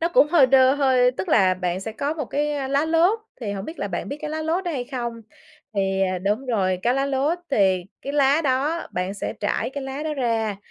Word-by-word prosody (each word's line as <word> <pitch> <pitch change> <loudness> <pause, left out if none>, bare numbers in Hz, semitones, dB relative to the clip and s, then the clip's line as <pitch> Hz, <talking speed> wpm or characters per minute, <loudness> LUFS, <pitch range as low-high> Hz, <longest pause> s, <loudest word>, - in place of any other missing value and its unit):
nó 335 - +1
cũng 340 - +5
hơi 305 -6 +5
đơ 260 +1 +5
hơi 260 -3 +3
tức 340 +8 -5
là 190 -9 +4
bạn 180 0 -2
sẽ 220 +2 -5
có 285 +7 -2
một 300 -4 -3
cái, 295 +4 -1
ơ, 275 -2 -3
lá 280 +3 +2
lốt. 335 +7 +3 0.2
Thì 210 -4 -3
hổng 195 0 -5
biết 330 - -8
là 200 - -2
bạn 175 - -4
biết 285 - -5
cái 305 0 -4
lá 315 0 -3
lốt 340 +4 -1
đó 350 - -1
hay 255 -5 -3
không? 245 -3 -4 0.6
Thì, 195 -1 0
à 185 -1 0
đúng 210 +8 -1
rồi, 190 -6 0
cái 245 +1 +2
lá 275 +1 0
lốt, 280 +5 0
thì 190 -7 +2 0.2
cái 280 - -4
lá 285 +1 +3
đó 285 +5 0
bạn 180 +2 -2
sẽ 205 - -4
trải 205 +4 -1
cái 280 0 -5
lá 270 +2 -5
đó 310 -1 -2
ra, 225 -6 -1
265 Hz, 250 wpm, -23 LUFS, 205-295 Hz, 0.6 s, cũng